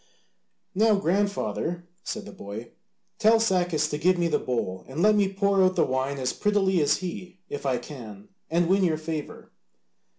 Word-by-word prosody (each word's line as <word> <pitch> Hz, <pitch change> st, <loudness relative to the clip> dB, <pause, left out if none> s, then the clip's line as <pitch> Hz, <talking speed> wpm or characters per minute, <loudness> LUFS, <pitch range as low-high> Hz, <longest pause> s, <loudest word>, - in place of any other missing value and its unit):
"Now, 215 Hz, +2 st, +4 dB
grandfather," 190 Hz, -2 st, -1 dB, 0.2 s
said 215 Hz, -2 st, -5 dB
the -, -, -9 dB
boy, 105 Hz, +4 st, -8 dB, 0.5 s
"tell 225 Hz, +1 st, +5 dB
Sacas 180 Hz, -8 st, +1 dB
to 150 Hz, -, -2 dB
give 180 Hz, +4 st, +3 dB
me 170 Hz, -1 st, +1 dB
the -, -, +1 dB
bowl, 95 Hz, -7 st, -3 dB
and 145 Hz, +7 st, -2 dB
let 215 Hz, 0 st, +6 dB
me 200 Hz, -2 st, +2 dB
pour 200 Hz, 0 st, +2 dB
out 185 Hz, 0 st, +3 dB
the -, -, +3 dB
wine 130 Hz, +2 st, -1 dB
as 130 Hz, -1 st, -1 dB
prettily 195 Hz, -4 st, +2 dB
as 145 Hz, 0 st, +3 dB
he 180 Hz, +1 st, -7 dB
if 145 Hz, -1 st, -4 dB
I 130 Hz, -2 st, +1 dB
can, 115 Hz, -6 st, -10 dB, 0.2 s
and 170 Hz, +1 st, +2 dB
win 190 Hz, +2 st, +3 dB
your 165 Hz, -4 st, +2 dB
favour." 155 Hz, -1 st, -6 dB
175 Hz, 175 wpm, -26 LUFS, 140-195 Hz, 0.5 s, let